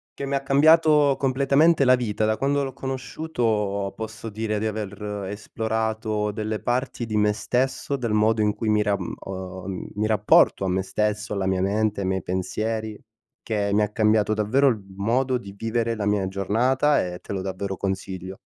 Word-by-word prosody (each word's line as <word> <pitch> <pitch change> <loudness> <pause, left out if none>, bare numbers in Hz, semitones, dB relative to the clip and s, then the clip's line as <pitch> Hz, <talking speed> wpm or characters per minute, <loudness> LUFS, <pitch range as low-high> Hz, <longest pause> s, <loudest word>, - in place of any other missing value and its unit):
che 140 - -5
mi 140 - -2
ha 140 - 0
cambiato 150 +1 +5
completamente 140 +3 +3
la 130 0 +6
vita. 110 -3 -1
Da 110 0 +1
quando 140 +1 +1
l'ho 135 - -5
conosciuto, 120 -7 -2
posso 110 0 -6
dire 110 0 -2
di 110 - -2
aver 105 -1 -4
esplorato 110 0 -2
delle 110 0 -3
parti 125 -1 -2
di 110 - -2
me 105 0 +3
stesso, 130 +5 -1
del 120 -4 -3
modo 110 +1 +3
in 105 0 +2
cui 110 +1 -4
mi 105 0 +3
ram 100 -3 -1
uhm, 95 0 -7
mi 105 +1 0
rapporto 105 -2 +4
a - - 0
me 95 +1 0
stesso, 105 +1 -2
alla 95 -1 -1
mia 95 -1 +1
mente, 105 +1 0
ai 95 - -1
miei 95 0 -1
pensieri, 110 +4 -3 0.4
che 105 -2 -1
mi 105 - +3
ha 105 - 0
cambiato 110 0 +2
davvero 110 +7 +2
il 115 -7 +2
modo 125 +5 +1
di 100 -5 -10
vivere 115 +1 -1
la 105 - -3
mia 100 -2 +1
giornata 120 +10 +2
e 90 0 -6
te - - -8
lo 95 - -2
davvero 95 +1 -4
consiglio. 95 0 -4
110 Hz, 180 wpm, -24 LUFS, 100-125 Hz, 0.4 s, la